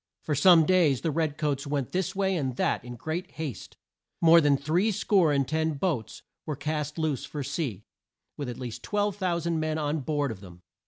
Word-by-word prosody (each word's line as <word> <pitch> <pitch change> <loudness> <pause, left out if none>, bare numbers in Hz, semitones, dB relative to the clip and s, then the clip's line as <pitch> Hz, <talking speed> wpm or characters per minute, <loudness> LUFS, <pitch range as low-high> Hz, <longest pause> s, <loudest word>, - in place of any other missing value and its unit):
For 155 - -1
some 165 +2 +6
days 165 -7 +3
the 160 - 0
red 155 -1 -1
coats 145 -2 -1
went 140 -3 -2
this 185 0 -1
way 190 -1 +1
and 135 -7 -2
that - - 0
in 120 0 -8
great 155 +9 -5
haste. 155 -6 -6 0.4
More 165 0 +7
than 145 -2 +3
three 170 +10 +1
score 185 -5 +3
and 140 -2 +1
ten 160 +1 0
boats 140 -6 -3 0.2
were 150 - -4
cast 150 +1 -3
loose 155 -5 -1
for 145 -2 -5
sea, 135 - -4 0.5
with 140 -4 -5
at 120 - -6
least 125 -3 -6
12,000 185 -5 -1
men 155 0 -1
on 150 0 -1
board 145 -1 -1
of 105 - -8
them. 90 -2 -14
150 Hz, 195 wpm, -27 LUFS, 140-170 Hz, 0.5 s, More